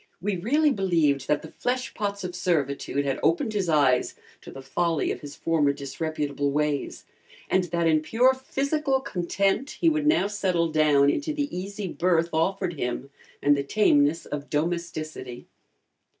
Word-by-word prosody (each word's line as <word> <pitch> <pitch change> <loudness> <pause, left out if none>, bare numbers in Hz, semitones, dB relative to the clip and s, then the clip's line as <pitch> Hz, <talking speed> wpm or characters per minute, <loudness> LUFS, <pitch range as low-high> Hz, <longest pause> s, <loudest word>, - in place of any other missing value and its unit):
We 200 +2 -1
really 290 - +2
believed 165 - +1
that 150 - +1
the - - -10
fleshpots 210 -5 -2
of 180 -1 -4
servitude 145 -5 -1
had 135 -1 -1
opened 170 +7 +1
his 195 -4 -1
eyes 140 -5 +3 0.3
to - - -11
the 135 - -10
folly 165 +3 0
of - - -5
his 145 -1 -9
former 155 -4 +1
disreputable 145 0 -3
ways, 150 0 -2 0.5
and 185 -1 +3
that 170 -1 -1
in 155 -1 +3
pure 245 +10 +3
physical 275 +1 -1
content 195 +4 -1
he 335 - +4
would 305 -1 0
now 315 -8 +4
settle 185 -5 0
down 145 -2 +4
into 300 - -2
the 290 -6 -3
easy 200 +2 -5
berth 170 -1 +1
offered 175 0 0
him 125 +3 -3 0.3
and 145 0 +5
the 140 - -1
tameness 145 -1 +2
of 145 0 -6
domesticity. 155 -5 -3
170 Hz, 155 wpm, -26 LUFS, 145-200 Hz, 0.5 s, and